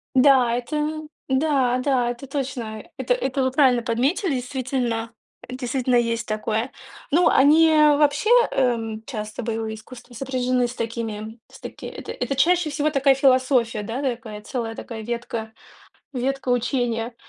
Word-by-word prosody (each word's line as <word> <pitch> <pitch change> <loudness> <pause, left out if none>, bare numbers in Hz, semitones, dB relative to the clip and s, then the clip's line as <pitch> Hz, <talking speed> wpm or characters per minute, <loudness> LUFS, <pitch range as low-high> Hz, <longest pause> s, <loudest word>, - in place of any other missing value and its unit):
Да, 255 -3 +5
это 300 +4 -2 0.3
да, 265 -2 +2
да 255 -2 +1
это 245 +3 -7
точно. 250 -6 -4
Это - - +1
это 270 - -1
вы 260 - +1
правильно 255 -3 +3
подметили. 270 - 0
Действительно, 250 -3 -2 0.4
Действительно 255 0 -2
есть 230 -1 0
такое. 215 +3 -2 0.4
Ну 335 +4 +4
они 305 +4 +5
вообще, 300 +4 +4 0.2
эм, 225 -4 0
часто 215 -1 -5
боевые 225 -1 -3
искусства, 240 +2 -13
сопряжены 255 0 0
с 240 - -7
такими 225 -1 -5
с - - -15
таки - - -9
это - - -7
это 275 - -3
чаще 340 +3 +3
всего 300 +1 0
такая 275 -1 +4
философия, 255 -4 +2
да 230 +6 -4
такая 230 -5 -4
целая 230 -3 -4
такая 225 -1 -7
ветка, 235 -1 -5 0.6
ветка 265 0 -2
учения. 245 -1 -1
250 Hz, 140 wpm, -23 LUFS, 230-275 Hz, 0.6 s, Да